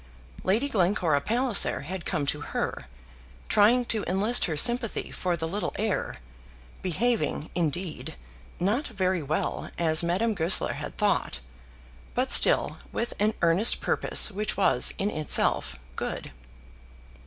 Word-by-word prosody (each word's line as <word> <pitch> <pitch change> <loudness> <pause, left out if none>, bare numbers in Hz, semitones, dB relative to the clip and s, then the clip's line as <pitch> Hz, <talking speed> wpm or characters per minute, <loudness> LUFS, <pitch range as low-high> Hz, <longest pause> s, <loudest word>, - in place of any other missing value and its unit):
Lady 220 +9 +1
Glencora 180 - 0
Palliser 230 - +4
had 170 +4 -7
come 145 - -2
to 145 +1 -2
her, 60 - -5 0.6
trying 225 +4 +3
to 220 -3 0
enlist 200 +7 +2
her 160 -4 -3
sympathy 240 +4 +2
for 180 -2 -2
the 160 0 -4
little 200 +5 -4
heir, 215 -1 -3 0.6
behaving, 190 -3 -2
indeed, 175 - -3 0.4
not 215 - 0
very 185 -6 -2
well, 150 +2 -3
as 160 -2 +3
Madame 185 +7 -1
Goesler 175 -2 +1
had - - -8
thought, - - -1 0.8
but - - -1
still - - +5
with 235 - -3
an 210 +2 +1
earnest 170 +7 +4
purpose - - +2
which 210 0 -4
was 130 -11 +4
in 200 +2 -2
itself 150 - +1 0.2
good. - - -5
190 Hz, 130 wpm, -26 LUFS, 165-220 Hz, 0.8 s, still